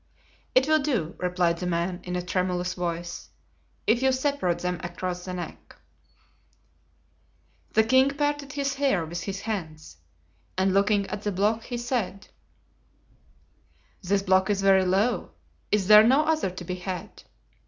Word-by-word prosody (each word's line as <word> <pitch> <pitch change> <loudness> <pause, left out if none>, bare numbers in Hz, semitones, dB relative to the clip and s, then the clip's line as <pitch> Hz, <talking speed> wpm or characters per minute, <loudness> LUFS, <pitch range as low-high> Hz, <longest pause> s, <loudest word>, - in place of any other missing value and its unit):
"It 260 +2 +5
will 310 0 +4
do," 235 - -1
replied 180 -2 0
the 180 - -3
man, 175 +1 -1
in 180 0 -4
a 180 - -2
tremulous 180 0 -1
voice, 175 -1 -4 0.6
"if 235 +3 +3
you 265 0 +4
separate 260 - 0
them 180 -1 -3
across 180 0 -4
the 185 - -5
neck." 175 - -8 2.0
The 220 - +5
king 260 +4 +4
parted 290 0 -2
his 275 -1 -1
hair 270 -12 +1
with 170 +2 -5
his 195 0 -5
hands, 160 - -5 0.6
and 190 0 +2
looking 200 +1 +3
at 205 +1 -5
the 210 - -2
block 210 +4 0
he 245 - -4
said: 225 -5 -3 1.7
"This 195 +1 0
block 190 0 +3
is 200 -1 0
very 190 -1 +5
low, 200 +6 0 0.4
is 205 -2 +2
there 210 +2 +9
no 260 +7 +5
other 315 -8 +1
to 185 0 -8
be 180 +1 -4
had?" 180 -1 -6
195 Hz, 150 wpm, -26 LUFS, 180-240 Hz, 2.0 s, there